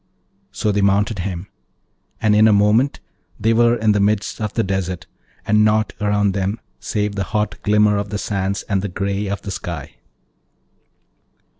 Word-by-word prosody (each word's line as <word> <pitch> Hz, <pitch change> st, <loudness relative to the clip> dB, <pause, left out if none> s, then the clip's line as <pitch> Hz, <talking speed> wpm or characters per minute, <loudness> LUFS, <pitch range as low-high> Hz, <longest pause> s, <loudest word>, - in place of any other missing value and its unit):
So 105 Hz, -, -1 dB
they 100 Hz, 0 st, +1 dB
mounted 100 Hz, +1 st, +2 dB
him, 90 Hz, 0 st, -4 dB, 0.7 s
and 105 Hz, -1 st, +3 dB
in 110 Hz, +1 st, +6 dB
a -, -, +5 dB
moment 105 Hz, +7 st, +3 dB, 0.4 s
they 115 Hz, +1 st, +2 dB
were 120 Hz, +1 st, +4 dB
in 110 Hz, -2 st, +2 dB
the 105 Hz, -, +2 dB
midst 105 Hz, +2 st, 0 dB
of 105 Hz, -2 st, -2 dB
the 115 Hz, -, +1 dB
desert, 95 Hz, -2 st, -3 dB, 0.4 s
and 105 Hz, 0 st, +4 dB
naught 110 Hz, 0 st, +2 dB
round 105 Hz, -1 st, +2 dB
them 100 Hz, +3 st, -2 dB, 0.2 s
save 105 Hz, -1 st, -2 dB
the 100 Hz, -2 st, -2 dB
hot 105 Hz, 0 st, -2 dB
glimmer 105 Hz, 0 st, +3 dB
of 100 Hz, 0 st, -3 dB
the 105 Hz, -, -3 dB
sands 100 Hz, -1 st, -2 dB
and 100 Hz, -3 st, -1 dB
the 100 Hz, -, -3 dB
grey 100 Hz, +2 st, -2 dB
of 100 Hz, +1 st, -4 dB
the 100 Hz, -, -5 dB
sky. 85 Hz, -5 st, -6 dB
105 Hz, 170 wpm, -20 LUFS, 100-105 Hz, 0.7 s, in